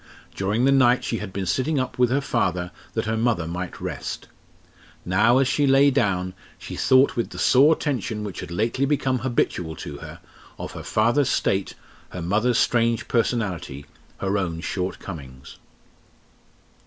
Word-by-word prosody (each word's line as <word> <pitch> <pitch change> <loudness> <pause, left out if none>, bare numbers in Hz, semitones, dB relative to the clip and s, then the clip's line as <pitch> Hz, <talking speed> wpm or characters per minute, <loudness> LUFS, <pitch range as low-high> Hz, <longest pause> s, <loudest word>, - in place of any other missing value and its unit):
During 105 +6 0
the 135 - +4
night 130 -2 +4
she 115 - -2
had - - -6
been 95 0 -3
sitting 130 - 0
up 130 -1 -4
with 125 -1 +4
her 135 +3 +1
father 90 -9 -1 0.2
that - - -1
her 110 +1 -1
mother 110 -6 +1
might 90 +2 -5
rest. - - -5 0.8
Now, 105 +7 +4
as 135 -1 +3
she 145 +1 +2
lay 135 +1 +5
down, 95 -8 0 0.2
she - - -8
thought 130 +1 +4
with 115 - -1
the - - -10
sore 145 +5 +5
tension 115 - -3
which 100 -3 -6
had - - -7
lately 115 +9 0
become 135 -3 +1
habitual 90 -10 -1
to 75 -2 -7
her, - - -10 0.4
of - - -6
her - - -8
father's 120 +6 +2
state, 95 0 0 0.3
her 90 - -7
mother's 110 +7 +1
strange 115 -1 +2
personality, 95 - -1 0.3
her 100 +1 0
own 85 -3 -3
short 90 +1 -3
comings. 65 -8 -10
110 Hz, 165 wpm, -24 LUFS, 90-130 Hz, 0.8 s, lay